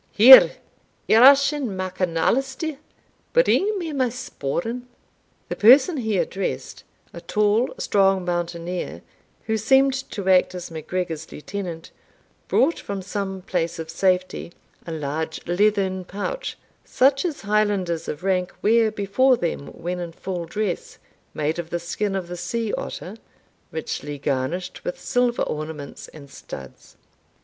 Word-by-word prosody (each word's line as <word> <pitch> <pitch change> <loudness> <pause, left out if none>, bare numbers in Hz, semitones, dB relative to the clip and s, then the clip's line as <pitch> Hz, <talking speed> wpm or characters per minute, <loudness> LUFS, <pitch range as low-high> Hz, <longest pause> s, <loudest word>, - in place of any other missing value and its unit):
Here, 255 +5 +9 0.5
Eachin 275 +4 +6
MacAnaleister, 190 - -1 0.6
bring 430 -4 +3
me 330 -4 -4
my 260 -3 +1
sporran." 235 - -4 0.6
The - - -4
person 265 - +6
he 220 -5 -1
addressed, 190 +2 -3 0.3
a - - -8
tall, 210 +3 +1
strong 195 -2 +2
mountaineer, 175 0 -3 0.4
who 220 0 0
seemed 265 +5 +4 0.2
to 200 -2 -5
act 185 -1 +4
as 180 -1 -7
MacGregor's 160 0 -4
lieutenant, 175 0 -6 0.6
brought 305 +6 +2
from 200 -1 -5
some 195 -1 -4
place 170 -2 -2
of 160 -1 -6
safety 185 0 0 0.4
a - - -4
large 160 +1 -4
leathern 190 0 +1
pouch, 355 - -5 0.3
such 275 +1 +2
as 335 -5 -3
Highlanders 200 -5 0
of 150 - -5
rank 185 -1 0
wear 225 +1 +4
before 215 +5 +2
them 170 -7 -3
when 180 +1 -5
in 170 -1 -6
full 180 -1 -5
dress, 195 +1 -3 0.4
made 155 +3 -1
of 170 -1 -5
the 175 - -1
skin 195 +4 -3
of 185 -3 -3
the 175 0 -6
sea 215 +5 -3
otter, 195 +5 -5 0.5
richly 150 -2 -5
garnished 140 +7 -3
with 175 - -4
silver 245 -1 +1
ornaments 155 -2 -6
and 145 -3 -13
studs. 65 - -11
190 Hz, 130 wpm, -23 LUFS, 170-230 Hz, 0.6 s, Here